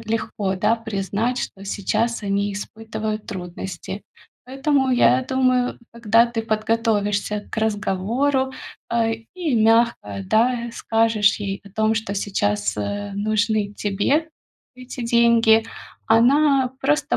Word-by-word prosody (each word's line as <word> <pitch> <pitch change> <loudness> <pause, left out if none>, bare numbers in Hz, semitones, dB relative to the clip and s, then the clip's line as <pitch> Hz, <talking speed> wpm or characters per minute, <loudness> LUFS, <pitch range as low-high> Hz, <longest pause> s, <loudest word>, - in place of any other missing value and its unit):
э, - - -10
легко, 210 -3 -1
да, 220 +5 +2
признать, 225 +2 -2
что 195 - -5
сейчас 230 +4 -1
они 200 0 -1
испытывают 215 +1 -5
трудности. 190 0 -6 0.4
Поэтому, 270 +1 +1
я 255 +1 +4
думаю, 255 -1 +1
когда 230 0 +3
ты 235 -1 -3
подготовишься 215 -2 0
к - - -6
разговору, 220 +6 0 0.4
э, 230 -1 +1 0.2
и 340 -7 -1
мягко, 225 - +2
да, 235 - +1
скажешь 225 -3 +2
ей 200 -1 -4
о - - -12
том, 220 +2 +1
что 220 -2 -3
сейчас, 105 - -1
э, 205 - -3
нужны 215 0 0
тебе 240 +12 0 0.4
эти 255 0 -8
деньги, 230 -1 +4 0.4
она 265 +3 +4
просто 295 +2 +1
225 Hz, 120 wpm, -22 LUFS, 205-240 Hz, 0.4 s, я